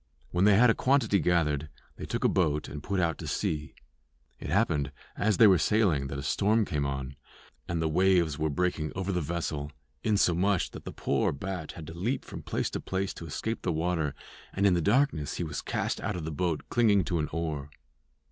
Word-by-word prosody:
When 90 +2 +2
they 105 -1 +6
had 120 +3 +6
a - - +3
quantity 125 -7 +2
gathered 75 -5 +1 0.3
they - - -7
took - - -2
a - - +5
boat 75 -4 +1
and 75 - -7
put 100 +3 -2
out 85 -2 0
to - - -6
sea. 75 -1 -2 0.6
It - - -6
happened 75 - +1 0.2
as 105 -2 +1
they 115 - +8
were 95 -4 +6
sailing 85 -6 +2
that 70 - -5
a 70 - -5
storm 105 +9 +2
came 75 -6 -1
on, 70 -1 -4 0.5
and 85 - -1
the - - +1
waves 85 -2 +2
were 80 0 +1
breaking 80 -1 -1
over 95 0 -2
the 90 -2 0
vessel, 75 -2 -3 0.3
insomuch 100 -2 +2
that - - -10
the - - -5
poor - - 0
bat 90 +2 -5
had 80 - -9
to 80 - -8
leap 115 +10 -2
from - - -8
place - - -2
to - - -3
place 95 0 -2
to 85 - -9
escape 110 +9 -3
the 90 - -1
water, 80 -2 -1 0.4
and 100 - +1
in 100 - +5
the 85 - +2
darkness 105 - +1
he - - -2
was 75 -3 -4
cast - - -2
out - - -2
of 85 -3 -4
the 80 - -3
boat 80 0 -1
clinging 105 -5 +3
to 85 -1 -1
an 75 - -1
oar. 75 -3 -3
85 Hz, 215 wpm, -29 LUFS, 75-100 Hz, 0.6 s, they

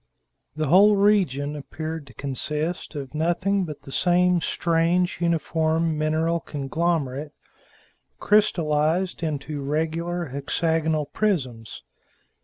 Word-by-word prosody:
The 155 0 -1
whole 200 +8 +6
region 180 -9 +2
appeared 155 +1 -6
to 125 - -15
consist 150 +7 -3
of 140 -2 -6
nothing 175 +5 0
but 150 -3 -8
the 135 - -10
same 180 +2 +3
strange, 170 +2 +1
uniform 165 -1 +1
mineral 160 +2 0
conglomerate, 145 -1 -2 0.9
crystallized 170 -4 +2
into 150 -2 -3
regular 160 +3 -2
hexagonal 160 +3 0
prisms. 130 - -2
160 Hz, 95 wpm, -24 LUFS, 150-175 Hz, 0.9 s, whole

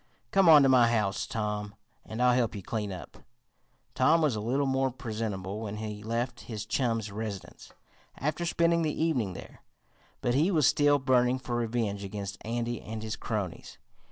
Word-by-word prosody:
Come 195 -3 +5
on 150 -3 +9
to - - +5
my 125 -2 +6
house, 105 -4 0
Tom, 105 -2 -3 0.3
and 110 +3 -3
I'll 125 0 +5
help 120 -3 +1
you 100 - -6
clean 105 -1 -3
up." 90 -2 -9 0.8
Tom 165 +2 +4
was 150 -7 +2
a - - -2
little 130 +6 0
more 135 0 +1
presentable 110 -6 -4
when 105 -1 -5
he 105 -1 -5
left 115 +3 -2
his 105 -2 -4
chum's 115 -3 -1
residence, 105 -2 -7 0.5
after 150 +5 -2
spending 170 0 +2
the 155 -2 -1
evening 130 - 0
there, - - -11 0.6
but 120 - +1
he 150 +8 +3
was 160 -7 +3
still 145 +3 +4
burning 130 -2 +2
for 125 -2 -4
revenge 115 -4 -1
against 100 +1 -6
Andy 120 0 -2
and 110 0 -6
his 110 -1 -3
cronies. 105 -6 -4
115 Hz, 175 wpm, -29 LUFS, 105-135 Hz, 0.8 s, on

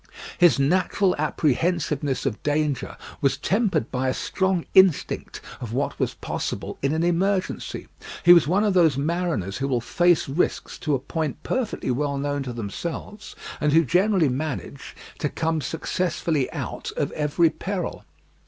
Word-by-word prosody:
His 175 -4 +6
natural 180 +6 +2
apprehensiveness 150 -2 0
of 120 -6 -2
danger 150 -2 -1 0.2
was 135 -1 +2
tempered 195 - 0
by 130 0 0
a 130 - -1
strong 190 -3 0
instinct 190 -5 +3 0.2
of 115 -2 -6
what 140 +3 -2
was - - -1
possible - - -4
in 140 - +1
an 160 +2 0
emergency. 185 +2 -1 0.4
He 175 -1 +9
was 170 -4 +5
one 190 +6 +2
of 210 -2 +2
those 165 -7 +4
mariners 150 - -1
who 135 - -1
will 130 -3 +1
face 175 +8 +2
risks 140 +6 -1
to 150 -2 0
a - - -1
point 155 +1 -4
perfectly 250 - -2
well 140 +2 -1
known 145 0 -1
to 130 -2 -4
themselves, 160 - -6 0.2
and 150 -1 +1
who 165 0 +5
generally 185 - +3
manage 140 +1 -4 0.2
to 150 - 0
come 160 +1 -1
successfully 165 0 -1
out - - -5
of - - -2
every 155 +2 +2
peril. 185 +3 -4
155 Hz, 155 wpm, -24 LUFS, 140-175 Hz, 0.4 s, He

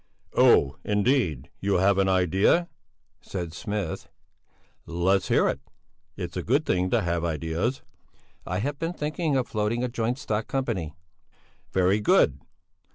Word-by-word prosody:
"Oh, 70 +1 +4
indeed! 105 - +1
You 100 0 0
have 95 +2 +3
an 95 0 +3
idea," 95 - +3 0.5
said 85 -4 -5
Smith, 105 +3 -4 0.8
"Let's 90 +2 +1
hear - - +3
it! - - -1 0.6
It's - - -5
a - - -1
good 140 +7 +1
thing 90 -5 +1
to - - +2
have 85 -1 -1
ideas!" 85 - -2 0.6
"I 90 - -3
have 140 +7 -2
been 165 +1 -2
thinking 155 -1 -1
of 125 - 0
floating 110 +3 -1
a - - +1
joint 120 +1 -1
stock 110 -4 -2
company." 105 - -2 0.8
"Very 95 +2 +3
good. 105 - +3
100 Hz, 140 wpm, -26 LUFS, 90-125 Hz, 0.8 s, Oh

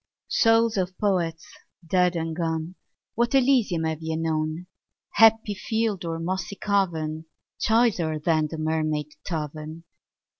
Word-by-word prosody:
Souls 225 -1 +3
of 185 -1 -2
Poets 175 -5 0 0.4
dead 180 +1 +2
and 165 -1 -2
gone, 165 0 -2 0.4
What 235 +3 +1
Elysium 245 -11 +3
have 160 0 -2
ye 160 0 -3
known, 160 +1 -2 0.5
Happy 225 -1 +5
field 215 -2 -2
or 165 -1 -3
mossy 185 +4 -3
cavern, 160 -7 -1 0.3
Choicer 215 -9 +2
than 155 0 +1
the 160 - -7
Mermaid 155 -1 -1
Tavern? 155 0 -5
165 Hz, 120 wpm, -25 LUFS, 160-200 Hz, 0.5 s, Happy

